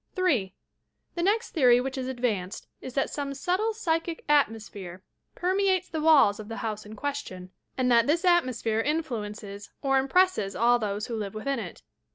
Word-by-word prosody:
3. 275 Hz, -, +1 dB, 0.6 s
The 345 Hz, -, -3 dB
next 425 Hz, +6 st, +1 dB
theory 250 Hz, -6 st, +5 dB
which 265 Hz, +1 st, -3 dB
is 260 Hz, -1 st, -3 dB
advanced 225 Hz, -7 st, -2 dB, 0.2 s
is 255 Hz, -, -8 dB
that 275 Hz, -, 0 dB
some 280 Hz, -1 st, -4 dB
subtle 370 Hz, +9 st, 0 dB
psychic 335 Hz, -6 st, -2 dB
atmosphere 210 Hz, -10 st, 0 dB, 0.3 s
permeates 375 Hz, 0 st, +1 dB
the 315 Hz, -, -3 dB
walls 290 Hz, -10 st, +5 dB
of 210 Hz, -, -8 dB
the 225 Hz, -, -6 dB
house 215 Hz, -1 st, -4 dB
in 215 Hz, -, -9 dB
question, 210 Hz, -9 st, -5 dB, 0.3 s
and 250 Hz, -1 st, +2 dB
that 235 Hz, -1 st, +5 dB
this 335 Hz, +5 st, +1 dB
atmosphere 255 Hz, -10 st, +2 dB
influences 215 Hz, -8 st, -4 dB
or 270 Hz, -1 st, +3 dB
impresses 270 Hz, -, +2 dB
all 240 Hz, +1 st, +4 dB
those 210 Hz, -1 st, -2 dB
who 235 Hz, -, -4 dB
live 210 Hz, -2 st, -5 dB
within 265 Hz, +4 st, -2 dB
it. 185 Hz, -6 st, -8 dB
255 Hz, 170 wpm, -27 LUFS, 215-320 Hz, 0.6 s, theory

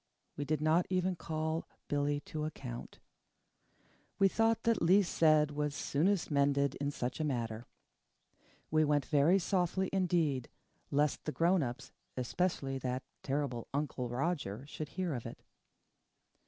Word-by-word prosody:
We 145 Hz, -, -3 dB
did 155 Hz, 0 st, 0 dB
not 160 Hz, +3 st, +3 dB
even 185 Hz, 0 st, +1 dB
call 160 Hz, 0 st, -3 dB, 0.2 s
Billy 145 Hz, 0 st, 0 dB
to 155 Hz, 0 st, -4 dB
account. 125 Hz, -6 st, -7 dB, 1.2 s
We 195 Hz, -, +6 dB
thought 225 Hz, +3 st, +2 dB
that 230 Hz, -1 st, +2 dB
least 185 Hz, +3 st, +4 dB
said 155 Hz, -2 st, +4 dB
was 150 Hz, 0 st, -2 dB
soonest 170 Hz, +6 st, +1 dB
mended 140 Hz, -1 st, +2 dB
in 140 Hz, -, +1 dB
such 125 Hz, -2 st, -3 dB
a -, -, 0 dB
matter. 120 Hz, -5 st, -2 dB, 1.0 s
We 155 Hz, 0 st, +4 dB
went 145 Hz, -2 st, +2 dB
very 155 Hz, +5 st, +4 dB
softly 185 Hz, 0 st, 0 dB
indeed, 165 Hz, -9 st, +1 dB, 0.4 s
lest 145 Hz, +1 st, +1 dB
the 155 Hz, -, -1 dB
grown 170 Hz, +3 st, +3 dB
ups, 125 Hz, +1 st, -4 dB, 0.3 s
especially 135 Hz, 0 st, -1 dB
that 130 Hz, 0 st, -2 dB, 0.2 s
terrible 135 Hz, -4 st, -2 dB
Uncle 140 Hz, -4 st, -2 dB
Roger, 130 Hz, -, -2 dB
should 150 Hz, 0 st, -6 dB
hear 180 Hz, -3 st, -2 dB
of 120 Hz, -3 st, -4 dB
it. -, -, -10 dB
150 Hz, 140 wpm, -33 LUFS, 140-170 Hz, 1.2 s, We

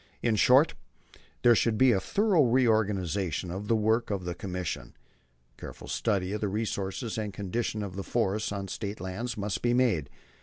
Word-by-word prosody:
In 115 Hz, -2 st, +2 dB
short, 130 Hz, +8 st, +5 dB, 0.7 s
there 120 Hz, -, +7 dB
should 115 Hz, -1 st, +2 dB
be 130 Hz, +1 st, +5 dB
a 100 Hz, -, +3 dB
thorough 200 Hz, -, +2 dB
reorganization 100 Hz, -, +1 dB
of 100 Hz, +3 st, -5 dB
the 115 Hz, -, +3 dB
work 110 Hz, +2 st, +1 dB
of 100 Hz, -3 st, -2 dB
the 90 Hz, -, -2 dB
Commission. 90 Hz, -5 st, -5 dB, 0.6 s
A -, -, -22 dB
careful -, -, -9 dB
study 100 Hz, -4 st, -1 dB
of 105 Hz, -, -3 dB
the 105 Hz, -, 0 dB
resources 110 Hz, +2 st, -3 dB
and 105 Hz, -1 st, -3 dB
condition 105 Hz, +3 st, -3 dB
of 95 Hz, -3 st, -6 dB
the 100 Hz, -, -3 dB
forests 105 Hz, -2 st, -1 dB
on 100 Hz, -1 st, -4 dB
State 105 Hz, +1 st, -5 dB
land 95 Hz, +7 st, -4 dB
must 100 Hz, -1 st, -2 dB
be 120 Hz, 0 st, +2 dB
made. 110 Hz, -, +2 dB
105 Hz, 180 wpm, -28 LUFS, 95-115 Hz, 0.7 s, there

